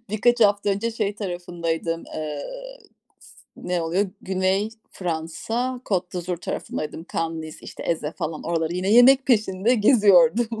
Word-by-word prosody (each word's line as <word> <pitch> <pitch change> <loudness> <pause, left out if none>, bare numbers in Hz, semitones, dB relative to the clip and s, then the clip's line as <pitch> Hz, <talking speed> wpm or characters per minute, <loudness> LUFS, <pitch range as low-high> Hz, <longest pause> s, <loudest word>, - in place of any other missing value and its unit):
birkaç 240 +3 +2
hafta 205 -1 +4
önce 215 +4 -1
şey 210 -3 -2
tarafındaydım, 170 -4 -3
eee, 150 -2 -4 0.7
s - - -18 0.2
ne 180 -1 -2
oluyor, 185 +4 0
Güney 190 +2 0 0.2
Fransa, 190 +9 -3
Côte 180 -3 -1
d’Azur 180 0 -3
tarafındaydım, 160 -1 -5
Cannes, 165 0 -2
Nice, 155 0 -9
işte, - - -9
Èze, 160 -2 -2
falan. 155 0 -4
Oraları 165 0 -1
yine 185 +2 -1
yemek 265 +3 +7
peşinde 215 -1 +2
geziyordum, 210 - +4
185 Hz, 135 wpm, -23 LUFS, 165-215 Hz, 0.7 s, yemek